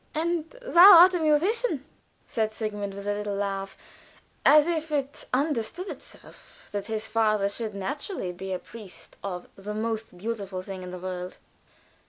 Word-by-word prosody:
"And 325 0 -1
thou 395 -5 +9
art 370 +1 +7
a 355 - 0
musician," 320 - +1 0.4
said 220 -2 -1
Sigmund, 205 -2 -4
with 200 0 -8
a 205 - +1
little 205 0 -3
laugh, 195 -1 -3 0.7
as 300 -1 +7
if 320 -2 -2
it 280 -2 -2
"understood 290 - -1
itself" - - -12
that 205 -1 -4
his 220 -1 -3
father 215 -2 +2
should 210 +1 -5
naturally 265 - -4
be 190 +2 -7
a 185 - 0
priest 185 -6 -13
of 180 -3 -5
"the 205 +2 -6
most 220 -3 -3
beautiful 200 -2 -4
thing 190 -1 -7
in 180 - -7
the 180 - -6
world." 180 0 -6
215 Hz, 160 wpm, -26 LUFS, 195-300 Hz, 0.7 s, thou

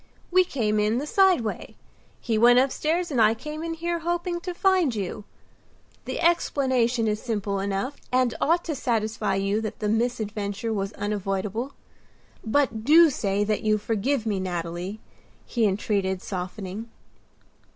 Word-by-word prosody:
"We 370 +1 +6
came 220 -11 0
in 210 +2 +2
the 280 - -2
side 380 -2 +4
way. 220 - -5 0.4
He 230 - -1
went 240 +3 +6
upstairs 310 +6 +1
and 250 -5 +2
I 220 +1 +5
came 300 +6 -6
in 330 0 -3
here 340 +1 -2
hoping 345 +1 -2
to 360 +1 -5
find 360 - +2
you. 205 0 -4 0.8
The - - -4
explanation 260 -8 +2
is 210 0 -1
simple 205 -4 -2
enough 200 +8 -2
and 255 -1 +2
ought 340 +3 +2
to 325 - -2
satisfy 220 -5 -1
you 195 +2 0
that 215 - -5
the 210 - -2
misadventure 220 -2 -1
was 195 -1 -2
unavoidable. 205 +5 -3 0.7
But 225 -2 +1
do 320 +4 +7
say 200 -4 0
that 210 0 0
you 215 0 +2
forgive 225 +4 -1
me, 205 -3 0
Nathalie," 175 +2 -4 0.5
he 230 -3 +1
entreated, 190 -1 -1
softening. 190 +3 -5
225 Hz, 150 wpm, -25 LUFS, 205-285 Hz, 0.8 s, do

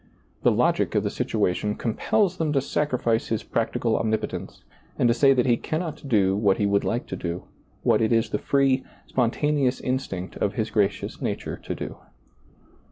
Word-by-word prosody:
The - - +4
logic - - +1
of - - +3
the - - -1
situation 105 +3 0
com 115 - -2
pels 190 - +1
them 160 -3 0
to 140 - +3
sacrifice 125 -5 0
His 110 -1 -1
practical 115 0 0
omnipotence 110 0 -3 0.3
and 125 - +3
to 115 - +4
say 135 +3 +5
that 125 - +2
He 120 -2 +3
cannot 155 -3 -4
do 95 -5 +3
what 100 -2 +3
He 105 - +1
would 100 0 +2
like 120 - -1
to - - -5
do, 85 -1 -4 0.4
what - - +3
it 110 - +2
is 115 -1 +2
the 105 - 0
free, 135 -1 +2 0.2
spontaneous 135 +2 +1
instinct 110 -8 -3
of 100 - -1
His 110 -3 -1
gracious 105 -3 0
nature - - -3
to - - -5
do. - - -6
115 Hz, 180 wpm, -25 LUFS, 105-135 Hz, 0.4 s, say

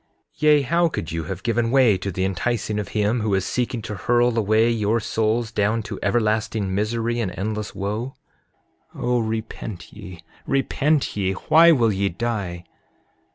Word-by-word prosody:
7:16 - - -27
Yea, 150 -1 +5
how 170 +6 +2
could 85 - -5
you 80 -1 -3
have 95 +3 -6
given 115 0 +1
way 125 -5 +5
to 95 +2 -4
the 95 +1 -1
enticing 105 +2 -1
of 105 - -4
him 105 +2 0
who 105 -2 +1
is 95 -1 0
seeking 120 -2 -2
to 110 - -5
hurl 120 +4 +1
away 110 +1 +3
your 115 -1 +1
souls 110 +1 -1
down 110 +1 0
to 100 - -7
everlasting 110 -2 0
misery 115 +3 -1
and 105 -6 -1
endless 105 +1 -4
wo? 105 +7 -3 0.8
7:17 - - -7
O 125 0 +2
repent 110 -4 -5
ye, 85 -2 -11 0.2
repent 140 +2 +1
ye! 95 -2 0
Why 165 +11 +5
will 120 -8 +3
ye 100 0 0
die? 95 -4 -3
110 Hz, 170 wpm, -22 LUFS, 100-120 Hz, 0.8 s, Yea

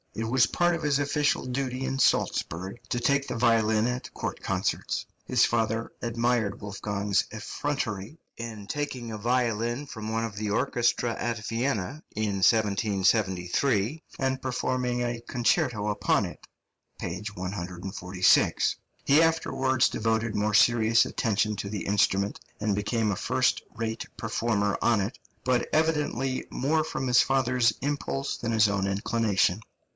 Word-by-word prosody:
It 110 0 -2
was 120 -1 +4
part 175 0 +2
of 165 - -5
his 145 -2 +2
official 145 0 +1
duty 130 0 -2
in 135 - -2
Salzburg 95 -6 +1
to 120 - 0
take 140 +2 +1
the 125 - -3
violin 110 -2 +3
at 125 0 -4
court - - -4
concerts. - - -1 0.2
His 125 -2 +4
father 115 0 0
admired 115 -3 0
Wolfgang's 100 0 -1
effrontery 110 0 -3 0.2
in 110 -3 -7
taking 130 -5 -4
a 110 - -4
violin 120 +2 0
from 110 -5 -6
one 115 +1 0
of 110 -3 -6
the 105 0 -3
orchestra 120 +1 +1
at 115 -2 -3
Vienna 120 - -2
in 105 -2 -1
1773, 105 - +2 0.2
and 130 0 0
performing 125 -1 -1
a 120 -1 -2
concerto 120 -3 +1
upon 105 - +1
it - - -9 0.5
(p. 90 +4 -4
146). 90 0 +1 0.3
He 145 +3 +6
afterwards 135 -6 +2
devoted 110 0 -1
more 105 0 +1
serious 115 0 +5
attention 105 -1 0
to 100 - -4
the 105 -1 -4
instrument, 100 0 +1 0.2
and 105 -1 0
became 105 +1 0
a - - -1
first - - +1
rate 110 0 -3
performer 110 -2 0
on 115 -3 +3
it, 100 +4 -3 0.3
but 125 -1 +1
evidently 150 -4 0
more 155 +4 +1
from 135 -4 -3
his 120 -1 +6
father's 125 -3 +2
impulse 140 -1 -2
than 115 - -3
his 110 -1 +5
own 100 -1 0
inclination. 100 -1 +1
115 Hz, 140 wpm, -27 LUFS, 105-130 Hz, 0.5 s, He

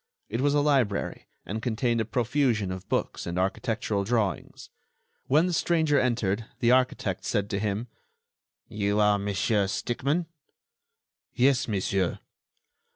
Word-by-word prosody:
It 115 +4 -2
was 145 +1 +2
a 145 - +4
library, 135 -9 0 0.2
and 110 +3 -4
contained 115 0 0
a - - -1
profusion 120 -4 0
of 95 +1 -7
books - - -2
and 85 +1 -3
architectural 100 +2 -1
drawings. 105 -5 -2 0.6
When 150 +6 +4
the 180 - -1
stranger 160 -3 +2
entered, 115 -4 0
the 120 -1 +3
architect 125 -7 +1
said 100 +3 -1
to 100 - 0
him: 105 +3 -2 0.8
"You 105 -1 -1
are 105 -1 +4
Monsieur 100 +1 +1
Stickmann?" 140 - -1 1.1
"Yes, 130 0 +3
monsieur." 95 -3 0
110 Hz, 130 wpm, -27 LUFS, 100-130 Hz, 1.1 s, a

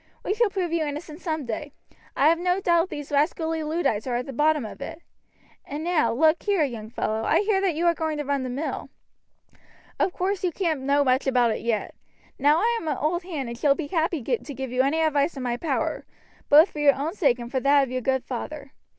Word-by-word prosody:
We - - +1
shall 450 0 +2
prove 370 -4 -2
you 335 -2 +1
innocent 300 +2 -6
some 315 -4 -3
day. 275 +5 -5 0.4
I 280 - +5
have 335 +1 +2
no 360 +1 +1
doubt 345 -1 +2
these 290 -1 -7
rascally 320 +2 0
Luddites 300 -8 -1
are 245 - -1
at 245 +1 -2
the 275 - -7
bottom 300 0 +2
of 215 - -9
it. 320 +3 -6 0.6
And 295 +2 -6
now, 320 -9 +2
look 315 +6 +3
here, 400 -6 +1
young 230 -6 -4
fellow, 220 -1 -2
I - - +3
hear 410 -2 +1
that 375 -5 +1
you 335 +3 -1
are 340 - +5
going 315 -2 -2
to 295 - -3
run 280 0 0
the 255 - -4
mill. 275 +6 -4 1.1
Of - - +2
course 380 +2 -2
you 360 - +1
can't 325 -5 -1
know 280 +2 +2
much 260 0 +1
about 245 -3 +3
it - - -3
yet. 230 -2 -2 0.5
Now 295 +4 +4
I 470 +1 +2
am 325 - -7
an 295 -4 0
old 325 +5 0
hand 315 -8 -5
and 235 - -5
shall 275 +3 +3
be 290 -3 -5
happy 325 -4 0
to 315 - -2
give 265 -1 -5
you 250 +1 +2
any 280 +5 +1
advice 300 -1 +1
in 260 - -4
my 240 -1 -1
power, 315 +7 -2 0.5
both 310 +6 +7
for 300 - -7
your 285 -2 +5
own 290 +5 -3
sake 280 - +2
and 240 0 -8
for 260 - 0
that 280 +1 +4
of 260 - -4
your 255 0 -2
good 265 +1 0
father. 275 +3 -6
295 Hz, 235 wpm, -25 LUFS, 265-335 Hz, 1.1 s, both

